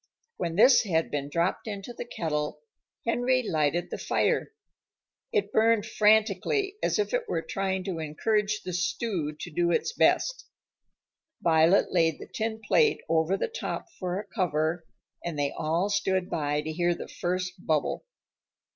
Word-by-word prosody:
When 165 -1 -2
this 240 +5 +7
had 165 -7 0
been 145 -1 -2
dropped 170 +8 -1
into 205 +2 -6
the 240 - -6
kettle, 150 -7 -3 0.4
Henry 245 +2 +2
lighted 160 +2 0
the - - -4
fire. - - 0 0.8
It 425 -4 0
burned 220 -1 +3
frantically, 220 - +2
as - - +1
if 420 +3 -1
it - - -1
were - - -1
trying 190 -1 -2
to 180 -4 -4
encourage 210 +7 0
the 180 - -5
stew 175 -3 -1
to 175 - -7
do 170 +3 +1
its 175 - 0
best. - - +2 1.0
Violet 165 +3 +4
laid 165 -3 +2
the - - -9
tin 220 0 -3
plate 450 -3 +3
over 165 +4 +2
the - - -1
top 450 -6 -5
for 180 0 -2
a 210 - -6
cover, 165 -4 -1 0.4
and 170 -3 -4
they 145 -1 0
all 165 +5 0
stood 190 -2 0
by 150 -2 0
to 155 - -4
hear 175 +2 +1
the - - -7
first 180 +1 -3
bubble. 155 - 0
185 Hz, 155 wpm, -28 LUFS, 160-220 Hz, 1.0 s, this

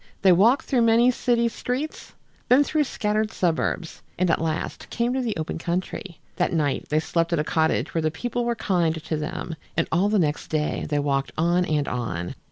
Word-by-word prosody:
They 190 - +7
walked 220 +10 +4
through 255 -3 +2
many 230 +2 +5
city 240 -1 +1
streets, 250 +6 -4 0.4
then 260 +4 +6
through 310 +2 -1
more - - +5
scattered 215 -3 -1
suburbs, 175 -2 -1 0.2
and 180 -1 +2
at 160 - +1
last 160 -1 -3
came 240 +1 0
to 260 - 0
the 230 -6 -2
open 160 +1 -3
country. 175 +1 -4 0.2
That - - +1
night 150 -4 0
they 155 - +2
slept 165 +1 0
at - - +2
a 150 - +1
cottage 160 +1 0
where 165 - +1
the 155 - +1
people 240 +9 -3
were 235 0 0
kind 175 -7 +1
to 160 0 -4
them, 155 +2 -4 0.2
and 165 - +2
all 185 +5 +3
the 215 - +2
next 150 -5 0
day 155 -1 -1
they 150 - 0
walked 140 -1 0
on 175 +3 +2
and 150 -3 0
on. 90 -9 -3
175 Hz, 205 wpm, -24 LUFS, 155-230 Hz, 0.4 s, They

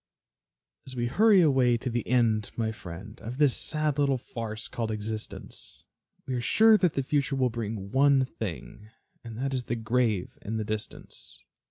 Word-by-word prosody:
As 130 - -7
we 120 -1 -1
hurry 200 - +5
away 130 -6 +4
to 125 - -7
the 120 -2 -2
end, 115 -4 +2
my 110 -1 0
friend, 105 +2 -9
Of 120 +3 -6
this 145 -4 +4
sad 150 -2 0
little 140 -2 +2
farce 115 -3 -6
called 115 -2 -3
existence, 110 0 -6 0.4
We 130 - -4
are 125 - -1
sure 220 - +5
that 180 -5 +2
the 135 - 0
future 140 0 0
will 130 -2 +1
bring 110 -3 -5
one 135 0 +4
thing, 105 - -7 0.3
And 115 -2 -8
that 135 +2 -2
is 125 -2 -2
the 120 - -2
grave 115 -4 0
in 110 +2 -4
the 110 - -2
distance. 110 0 -7
120 Hz, 175 wpm, -28 LUFS, 110-135 Hz, 0.4 s, hurry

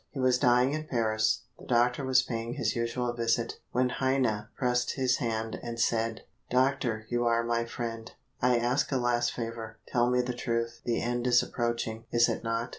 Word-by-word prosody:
He 140 - -7
was 130 -1 +3
dying 125 +2 +4
in 155 0 -4
Paris. 110 -3 +1 0.2
The - - -13
doctor 125 +2 +2
was 130 -1 +4
paying 115 -1 -4
his 110 -1 -1
usual 120 +1 -1
visit, 115 0 -1
when 125 +1 +2
Heine 125 -5 0
pressed 125 -1 +1
his 130 -2 +2
hand 110 -1 -2
and 120 0 -6
said: 115 -1 +1 0.3
"Doctor, 125 -4 +1
you 120 0 0
are 115 0 +2
my 115 0 0
friend, 115 -1 -5 0.3
I 125 0 +4
ask 125 +5 +1
a 135 - +2
last 120 -1 +1
favor. 115 -1 -6
Tell 120 0 +2
me 125 0 +3
the 125 0 -3
truth 115 -1 -2
the 120 -1 +1
end 120 +1 -1
is 125 0 +5
approaching, 115 -2 -2
is 120 0 +4
it - - -3
not?" 115 +1 -1
120 Hz, 190 wpm, -29 LUFS, 115-125 Hz, 0.3 s, is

